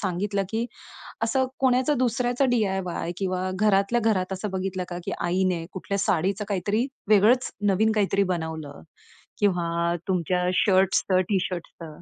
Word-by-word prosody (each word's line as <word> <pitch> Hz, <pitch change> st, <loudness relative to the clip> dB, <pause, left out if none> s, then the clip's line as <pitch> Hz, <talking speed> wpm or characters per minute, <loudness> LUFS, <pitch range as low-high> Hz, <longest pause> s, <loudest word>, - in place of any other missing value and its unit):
सांगितलं, 195 Hz, +1 st, -1 dB
की 225 Hz, +2 st, -1 dB, 0.6 s
असं 260 Hz, +3 st, +1 dB
कोणाचा 260 Hz, +2 st, +3 dB
दुसऱ्याचा 245 Hz, +2 st, +1 dB
डी-आय-वाय 190 Hz, -6 st, -1 dB
किंवा 185 Hz, -1 st, -1 dB
घरातल्या 210 Hz, +3 st, +2 dB
घरात 185 Hz, -1 st, -1 dB
असं 200 Hz, +2 st, -4 dB
बघितलं 190 Hz, -1 st, -2 dB
का, 175 Hz, -, -5 dB
की -, -, -3 dB
आईने 175 Hz, -1 st, 0 dB
कुठल्या 200 Hz, +1 st, -3 dB
साडीचं 195 Hz, +3 st, 0 dB
काहीतरी 205 Hz, +5 st, 0 dB, 0.2 s
वेगळंच 215 Hz, +5 st, +4 dB, 0.2 s
नवीन 220 Hz, +4 st, +2 dB
काहीतरी 200 Hz, -1 st, +2 dB
बनवलं? 160 Hz, -, -5 dB, 0.6 s
किंवा 170 Hz, -3 st, +1 dB
तुमच्या 180 Hz, -1 st, 0 dB
शर्ट्सचं, 190 Hz, -1 st, +3 dB
टी 195 Hz, -2 st, +2 dB
शर्ट्सचं. 170 Hz, -3 st, -8 dB
190 Hz, 130 wpm, -25 LUFS, 180-215 Hz, 0.6 s, वेगळंच